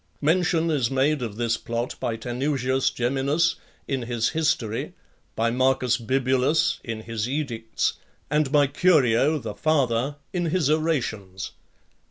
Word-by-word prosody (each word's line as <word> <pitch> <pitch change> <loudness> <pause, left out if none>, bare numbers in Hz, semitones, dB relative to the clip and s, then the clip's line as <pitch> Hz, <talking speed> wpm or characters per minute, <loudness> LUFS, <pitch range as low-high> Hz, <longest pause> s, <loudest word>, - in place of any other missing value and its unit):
Mention 165 +1 +2
is 130 -7 +1
made 135 +2 +1
of 115 -4 -4
this 115 0 0
plot 120 +1 -3
by 115 - -1
Tanusius 130 +2 0
Geminus 140 +7 +1 0.3
in 135 -2 -1
his 120 -1 0
history, 145 -9 -1 0.4
by 115 +1 +1
Marcus 130 -1 +2
Bibulus 130 +4 +1
in 115 -2 -5
his 115 0 -3
edicts, 120 -6 -2 0.3
and 150 -2 +1
by 145 -1 +5
Curio, 145 -2 +3
the 115 -7 -5
father, 140 -3 +1 0.2
in 175 -2 0
his 160 -3 +1
orations. 115 - -1
130 Hz, 130 wpm, -25 LUFS, 115-150 Hz, 0.4 s, by